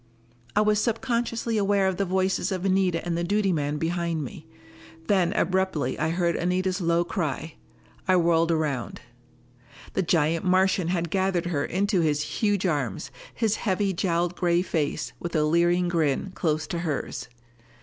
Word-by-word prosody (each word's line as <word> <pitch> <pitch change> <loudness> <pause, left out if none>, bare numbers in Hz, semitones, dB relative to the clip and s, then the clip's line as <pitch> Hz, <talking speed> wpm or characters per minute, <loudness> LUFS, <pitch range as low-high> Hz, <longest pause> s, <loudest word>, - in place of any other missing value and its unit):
I 210 - +5
was 210 0 +3
subconsciously 230 -1 -1
aware 200 -1 +2
of 190 -1 -1
the 200 - 0
voices 190 +1 0
of 185 0 -2
Anita 185 -3 +1
and 175 -1 -1
the 170 - -1
duty 200 +1 +1
man 145 -1 -1
behind 165 0 -1
me. 120 - -9 0.6
Then 185 -2 +2
abruptly 185 - 0
I 155 - +1
heard 170 0 +1
Anita's 185 +2 0
low 170 0 +2
cry. 160 -3 -3 0.5
I 185 - +5
whirled 170 -1 +3
around. 150 -6 -2 0.9
The - - +1
giant 165 -1 +1
Martian 185 -1 +2
had 170 -2 -1
gathered 190 -3 +1
her 155 -5 -1
into 195 +2 +1
his 150 -2 +1
huge 205 0 0
arms, 135 - -2 0.2
his 220 -2 0
heavy 195 -1 0
jowled 175 0 0
gray 175 0 +2
face, 155 -4 -2
with 170 -1 -5
a 155 - +3
leering 175 +3 +3
grin, 165 +1 0
close 155 -3 0
to 170 - -4
hers! 140 -6 -3
175 Hz, 160 wpm, -26 LUFS, 165-190 Hz, 0.9 s, I